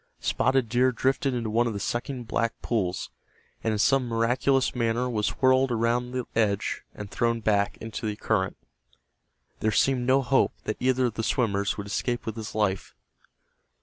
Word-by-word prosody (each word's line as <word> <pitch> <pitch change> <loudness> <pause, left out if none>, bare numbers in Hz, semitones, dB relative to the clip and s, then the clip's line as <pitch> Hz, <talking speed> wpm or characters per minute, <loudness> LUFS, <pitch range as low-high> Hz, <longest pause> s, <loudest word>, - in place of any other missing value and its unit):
Spotted 130 -2 +1
Deer 125 +3 +3
drifted 135 +1 0
into 115 -3 -2
one 120 +2 +2
of 115 - -2
the 100 - -4
sucking 125 +5 -3
black 115 0 -1
pools, 95 -6 -1 0.5
and 110 - +1
in 110 - 0
some 130 +4 +3
miraculous 125 +3 +1
manner 120 0 0
was 110 -4 -1
whirled 130 0 +4
around 120 +1 0
the 125 -1 -3
edge 105 -3 0
and 105 -1 -8
thrown 115 0 +1
back 105 -2 +1
into 110 0 -5
the 105 - -2
current. 100 -3 -1 1.0
There 110 - +1
seemed 125 +3 +2
no 135 +1 +4
hope 135 +1 +2
that 110 - -3
either 130 0 +2
of 120 - -1
the 115 - -3
swimmers 100 -4 0
would 100 - -5
escape 120 +4 -2
with 110 - -4
his 110 -2 -7
life. 95 - -1
115 Hz, 175 wpm, -26 LUFS, 110-125 Hz, 1.0 s, whirled